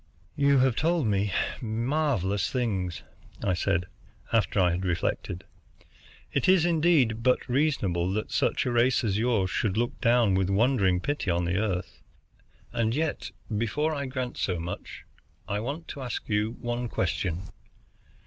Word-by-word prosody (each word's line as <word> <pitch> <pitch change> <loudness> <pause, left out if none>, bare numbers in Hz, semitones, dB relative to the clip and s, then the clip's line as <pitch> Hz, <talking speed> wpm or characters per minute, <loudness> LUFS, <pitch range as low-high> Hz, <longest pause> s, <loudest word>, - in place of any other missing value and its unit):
"You 140 -1 +4
have 130 -2 +3
told 165 0 +1
me 100 -1 +1 0.3
marvelous 115 - 0
things," 100 -9 -2 0.4
I 95 - +2
said, 90 0 0 0.5
after 110 -2 +2
I 90 -2 +4
had 90 +2 -2
reflected. 90 0 -2 0.9
"It - - +2
is, 185 -3 +5
indeed, 155 -9 +3
but 125 +1 +2
reasonable 120 - +1
that 110 +1 -3
such - - +1
a 125 - 0
race 120 +2 +3
as 105 -2 0
yours 110 -6 +1
should 105 -2 0
look 120 +1 -1
down 120 -4 +4
with 95 0 +1
wondering 100 -4 +3
pity 145 -6 -2
on 85 0 +1
the 90 +2 0
Earth. 95 -2 -3 0.7
And 115 -1 +1
yet, 155 0 -1 0.3
before 130 +9 0
I 140 -2 -3
grant 130 -1 -4
so 90 -3 -1
much, 85 +2 -6 0.4
I 100 - -1
want 145 +9 -4
to 140 - -6
ask 125 -2 -4
you 105 +1 0
one 120 0 -3
question. 90 -6 -1
115 Hz, 150 wpm, -27 LUFS, 95-130 Hz, 0.9 s, is